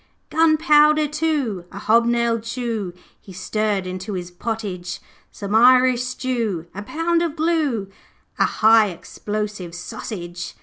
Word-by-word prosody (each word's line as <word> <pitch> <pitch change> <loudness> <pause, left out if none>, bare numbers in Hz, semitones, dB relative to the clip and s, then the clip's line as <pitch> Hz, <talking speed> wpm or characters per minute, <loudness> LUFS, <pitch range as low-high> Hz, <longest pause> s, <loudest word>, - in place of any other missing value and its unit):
'Gunpowder 305 -1 +4
too, 290 - -1
a 195 - -9
hob 230 +3 +3
nailed 235 -1 +1
shoe, 230 -5 -3 0.3
He 190 - -13
stirred 205 +1 -1
into 185 +3 -5
his 180 -1 -5
pottage; 190 -3 -5 0.3
Some 200 0 -6
Irish 250 +2 +5
stew, 240 -8 -2
a 205 - -6
pound 330 +9 0
of 335 -3 -1
glue, 310 - 0 0.5
A - - +5
high 220 0 +5
explosive 205 0 -5
sausage. 175 -2 -7
225 Hz, 125 wpm, -21 LUFS, 195-265 Hz, 0.5 s, Irish